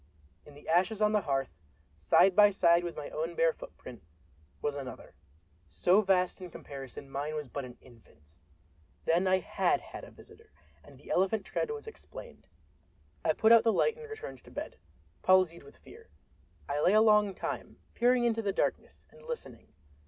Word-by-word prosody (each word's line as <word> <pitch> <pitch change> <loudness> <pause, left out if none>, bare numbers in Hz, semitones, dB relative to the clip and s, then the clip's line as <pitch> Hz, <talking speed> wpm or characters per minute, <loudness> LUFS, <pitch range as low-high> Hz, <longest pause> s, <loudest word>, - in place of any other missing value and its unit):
In 145 - -14
the 145 - -16
ashes 185 +6 +2
on 210 0 +3
the 210 -1 +2
hearth, 135 -5 -1 0.4
side 135 - +4
by 210 0 +8
side 175 -3 +3
with 175 -1 -5
my 150 - -7
own 165 +2 -3
bare 165 -1 +3
footprint, - - -11 0.6
was 145 -1 -2
another, 135 -3 -8 0.5
so 175 - +3
vast 185 -3 +1
that 185 - -7
in - - -9
comparison 135 -3 -9
mine 145 +3 -4
was 150 -2 -4
but 135 +2 -5
an 125 -1 -12
infant's! 85 - -21 0.6
Then 175 +3 +2
I 185 0 +4
had - - 0
had - - -10
a - - -10
visitor, 455 -1 -17 0.3
and - - -16
the - - -11
elephant 195 +2 +1
tread - - -2
was 445 -1 -6
explained. 445 - -11 0.8
I - - +2
put 220 - +3
out 230 -1 +8
the 225 - +3
light 460 - +2
and 465 -1 -11
returned 440 +2 -8
to - - -15
bed, - - -7 0.4
palsied 185 -2 +3
with - - -16
fear. 455 0 -16 0.6
I 145 +1 -1
lay 185 - +4
a 215 - +6
long 210 -3 +4
time, - - -5 0.2
peering 245 +1 +3
into 225 -1 +1
the 205 -2 -1
darkness, - - -2
and 480 - -18
listening. 480 0 -8
185 Hz, 180 wpm, -30 LUFS, 145-220 Hz, 0.8 s, by